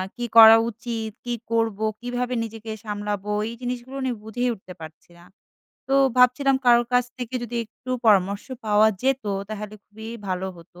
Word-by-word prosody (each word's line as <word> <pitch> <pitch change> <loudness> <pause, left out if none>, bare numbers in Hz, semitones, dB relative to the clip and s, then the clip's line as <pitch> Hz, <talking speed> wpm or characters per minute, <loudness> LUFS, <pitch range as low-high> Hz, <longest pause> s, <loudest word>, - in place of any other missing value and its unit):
কী 240 - -4
করা 225 0 +11
উচিত? 225 -1 -5 0.2
কী 240 - -2 0.2
করব? 225 -3 +1 0.2
কীভাবে 245 +1 -3
নিজেকে 225 0 -7
সামলাবো? 210 -1 -4 0.2
এই 235 - -7
জিনিসগুলো 250 +2 -5
নি 260 - 0
বুঝেই 245 +3 -2
উঠতে 185 -2 -13
পারছি 160 +2 -12
না। 175 - -17 0.6
তো 270 - +2 0.2
ভাবছিলাম 255 +2 +4
কারোর 240 -1 +5
কাছ 245 0 +4
থেকে 245 0 -6
যদি 240 0 -5
একটু 235 +3 -12 0.2
পরামর্শ 200 -1 +3 0.2
পাওয়া 210 +1 +5
যেত, 270 -3 +1 0.2
তাহলে 210 -1 -6
খুবই 220 +1 -11 0.2
ভালো 185 0 -2
হতো। 175 +1 -16
225 Hz, 160 wpm, -24 LUFS, 210-245 Hz, 0.6 s, করা